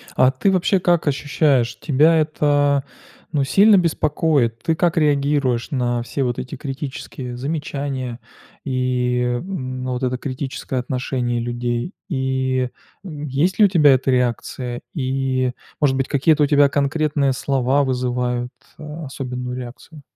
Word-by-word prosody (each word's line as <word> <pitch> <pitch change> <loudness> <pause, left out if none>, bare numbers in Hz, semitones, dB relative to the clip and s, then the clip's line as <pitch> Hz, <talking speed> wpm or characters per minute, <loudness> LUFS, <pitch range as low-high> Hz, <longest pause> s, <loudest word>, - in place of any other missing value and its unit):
А 130 +1 +5
ты 190 +9 +1
вообще 185 +1 +2
как 175 -3 +1
ощущаешь? 135 -4 +1
Тебя 155 +3 +4
это, 145 -2 +2 0.5
ну, 145 -3 +1
сильно 200 +8 +5
беспокоит? 150 -7 +1
Ты 165 - 0
как 170 0 +1
реагируешь 140 -5 +1
на 120 -3 0
все 135 +2 -2
вот 120 -1 -1
эти 130 +3 -6
критические 135 -3 -6
замечания 140 -3 -4 0.5
и, 125 -2 0 0.2
м, 130 -9 -5
но 130 0 -2
вот 125 +1 -4
это 125 0 0
критическое 130 -1 -4
отношение 125 -1 -2
людей, 120 - -3 0.2
и, 130 -2 0 0.4
м, 150 -4 -7
есть 150 +8 0
ли 210 - +8
у - - +6
тебя 150 -6 +6
эта 130 0 +1
реакция, 125 0 -1
и, 130 -3 0 0.3
может 140 -3 +3
быть, 135 0 -1
какие-то 150 +2 +3
у - - +5
тебя 145 -1 +5
конкретные 145 0 +1
слова 135 +1 +1
вызывают, 125 -1 -1 0.3
а, 155 +1 -7
особенную 125 -2 -5
реакцию? 130 +5 -10
135 Hz, 140 wpm, -21 LUFS, 125-150 Hz, 0.5 s, ли